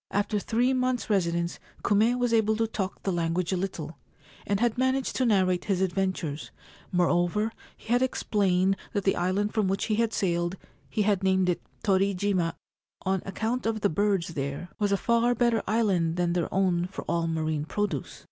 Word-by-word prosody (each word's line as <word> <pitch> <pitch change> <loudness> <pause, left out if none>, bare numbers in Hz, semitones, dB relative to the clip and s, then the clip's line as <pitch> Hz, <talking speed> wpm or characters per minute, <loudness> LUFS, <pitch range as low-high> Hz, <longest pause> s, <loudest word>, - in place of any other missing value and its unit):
After 205 +1 0
three 240 +5 +1
months' 255 -3 0
residence 170 -3 0 0.2
Kume 220 +4 +3
was 245 -1 +1
able 220 -1 +3
to 225 +1 +1
talk 200 -4 -4
the 195 - 0
language 170 +1 0
a - - +2
little, 175 -4 -4 0.5
and 200 -1 +1
had 235 -1 +2
managed 260 +1 0
to 255 - +2
narrate 185 -4 +2
his 195 -3 0
adventures; 185 -5 -1 0.4
moreover, 175 +4 +2 0.3
he 230 - -3
had 245 - +3
explained 195 -6 +1 0.2
that 205 - 0
the 195 - +2
island 190 +4 0
from 215 -3 +1
which 195 +1 0
he 215 - 0
had 230 -1 +2
sailed 175 -2 0 0.2
— - - -33
he 215 - 0
had 200 -2 +2
named 190 -1 +3
it 175 - 0 0.2
Torijima,1 195 -3 +1 0.5
on 190 -1 0
account 225 +4 -2
of 220 -1 -1
the 200 - +3
birds 195 -1 +1
there 140 +2 -4
— - - -39
was 205 -1 +1
a 200 - +3
far 235 +3 +2
better 235 -1 +2
island 190 -7 +1
than 175 -1 +1
their 175 -1 -1
own 180 -2 +1
for 190 - -7
all 170 -1 0
marine 155 -2 -1
produce. 205 +5 -3
195 Hz, 185 wpm, -27 LUFS, 175-220 Hz, 0.5 s, Kume